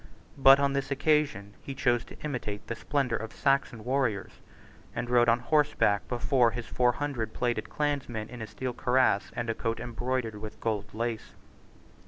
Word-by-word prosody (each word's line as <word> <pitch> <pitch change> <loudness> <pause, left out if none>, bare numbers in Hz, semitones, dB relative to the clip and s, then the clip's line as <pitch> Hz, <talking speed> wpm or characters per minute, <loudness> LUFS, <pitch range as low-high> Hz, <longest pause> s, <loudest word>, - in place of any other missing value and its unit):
But 135 +1 +8
on 140 -1 +2
this 140 -1 -1
occasion 140 -8 +1
he 135 - -7
chose 120 -3 +2
to - - -12
imitate 120 -8 -4
the - - -3
splendour 130 -1 -1
of 115 0 -6
Saxon 135 -5 0
warriors, 125 -6 -1 0.5
and 120 - -2
rode 120 -1 +5
on 115 - +5
horseback 120 - +2
before 125 0 +2
his 115 +1 -5
four 125 +1 +2
hundred 135 -6 -3
plaided 120 -3 -1
clansmen 140 -7 -2
in 125 -1 -9
a 110 - -5
steel 130 +2 -4
cuirass 125 -4 +2
and 120 - -2
a 115 - 0
coat 115 0 -2
embroidered 120 -2 -3
with 110 -1 -8
gold 105 -2 -2
lace. 115 -1 -3
120 Hz, 170 wpm, -29 LUFS, 115-135 Hz, 0.5 s, But